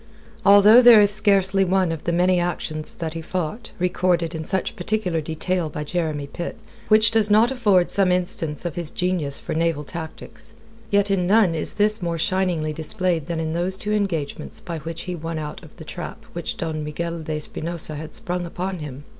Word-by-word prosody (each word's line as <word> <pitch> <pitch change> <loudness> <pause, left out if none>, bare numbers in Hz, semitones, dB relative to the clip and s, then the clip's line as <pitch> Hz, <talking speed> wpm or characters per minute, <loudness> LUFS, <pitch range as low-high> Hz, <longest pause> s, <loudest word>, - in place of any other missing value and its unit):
Although 205 +4 +8
there 240 -3 +9
is 205 -1 +5
scarcely 195 -2 +3
one 185 -2 +1
of 160 -2 -6
the 170 - +1
many 180 +1 +2
actions 155 -3 -3
that 160 -2 -4
he 165 - -5
fought 180 +6 -4
recorded 180 -2 0
in 160 -1 -4
such 190 +3 0
particular 180 -3 -1
detail 160 +2 -2
by 150 0 -5
Jeremy 155 -2 -2
Pitt 170 +5 -6 0.3
which 215 +1 +5
does 220 -2 +3
not 220 +4 +4
afford 205 -9 +2
some 190 -2 +2
instance 175 -4 -1
of 170 - -2
his 170 -1 -4
genius 175 -7 +2
for - - -5
naval 165 -2 0
tactics, 165 +8 -8 0.3
yet 200 0 +2
in 180 -2 +1
none 205 -3 +4
is 155 - -1
this 215 0 +1
more 170 -1 -2
shiningly 170 -3 0
displayed 165 +1 -2
than 170 -2 -3
in 160 0 -2
those 180 +3 -1
two 210 +2 -3
engagements 190 -9 -2
by 170 -2 -6
which 165 +2 -6
he 180 - -5
won 165 0 -5
out 150 -1 -6
of - - -15
the - - -10
trap - - -8
which - - -4
Don 160 -2 -3
Miguel 170 +3 -4
de 155 -1 -4
Espinosa 160 +1 -3
had 155 +1 -7
sprung 180 0 -3
upon 185 +2 -4
him. 145 -2 -8
175 Hz, 195 wpm, -22 LUFS, 160-195 Hz, 0.3 s, there